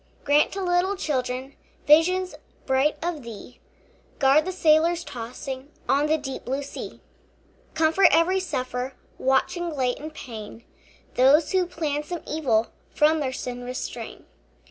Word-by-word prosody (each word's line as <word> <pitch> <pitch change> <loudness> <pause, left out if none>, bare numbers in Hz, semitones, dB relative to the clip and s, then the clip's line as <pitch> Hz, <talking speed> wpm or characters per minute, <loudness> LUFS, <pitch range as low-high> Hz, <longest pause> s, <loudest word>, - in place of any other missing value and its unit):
Grant 290 +1 +3
to 390 0 -3
little 360 +2 +1
children 260 -6 -3 0.3
Visions 360 +5 +4 0.3
bright 265 +3 +2
of 340 -3 -2
thee; 235 +1 -10 0.6
Guard 280 +3 +4
the 370 - -2
sailors 335 0 +3
tossing 260 +3 -7 0.2
On 285 +2 +3
the 315 +1 +3
deep 270 -3 -6
blue 270 +3 -2
sea. 280 - -8 0.7
Comfort 320 +4 +5
every 350 +4 +3
sufferer 255 -7 -3 0.2
Watching 270 +6 +1
late 260 -5 -1
in 305 +2 -6
pain; 230 -6 -9 0.5
Those 275 +5 +4
who 370 -2 +2
plan 300 -4 -2
some 335 +3 -6
evil 245 -8 +1 0.2
From 310 +1 +3
their 270 -3 -1
sin 245 -1 -5
restrain. 250 +1 -6
295 Hz, 135 wpm, -25 LUFS, 260-330 Hz, 0.7 s, Comfort